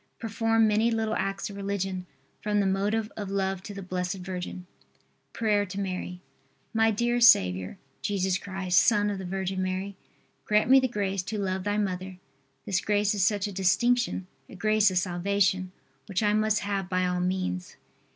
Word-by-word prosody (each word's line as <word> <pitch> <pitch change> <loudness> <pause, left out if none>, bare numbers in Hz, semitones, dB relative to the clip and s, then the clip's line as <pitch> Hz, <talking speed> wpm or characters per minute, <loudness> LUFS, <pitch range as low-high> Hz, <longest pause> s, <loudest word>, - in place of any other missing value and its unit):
Perform 225 0 +1
many 215 +2 +3
little 225 -1 -1
acts 195 0 -2
of - - -9
religion 195 -2 -3 0.3
from 210 0 0
the 200 - +2
motive 205 +3 0
of 205 -2 -5
love 195 -1 -1
to 205 - -8
the 195 -1 -7
Blessed 180 0 -2
Virgin. 180 -1 -6 0.7
PRAYER 210 -2 +1
TO 190 +2 -6
MARY. 185 -2 -4 0.5
My 225 0 +4
dear 240 +3 0
Saviour, 95 - +5 0.2
Jesus 190 -2 0
Christ, 190 -3 +1
Son 210 -3 +3
of 200 - -4
the 190 - -6
Virgin 190 0 -2
Mary, 185 +1 -3 0.5
grant 210 +3 +2
me 270 - +9
the 260 - +1
grace 195 -5 -2
to 200 +4 -5
love 190 -1 -2
Thy 205 0 0
mother. 185 -2 -3 0.5
This 195 -2 0
grace 205 0 +1
is 200 -3 +1
such 205 +1 +2
a 205 - -4
distinction, 210 +3 +1 0.2
a - - -11
grace 215 +2 +3
of 185 - -2
salvation, 185 +1 +1 0.4
which 195 +2 -1
I 210 0 +3
must 215 0 +2
have 200 -2 -2
by 185 0 +1
all 180 0 0
means. 180 - -2
195 Hz, 175 wpm, -27 LUFS, 185-210 Hz, 0.7 s, me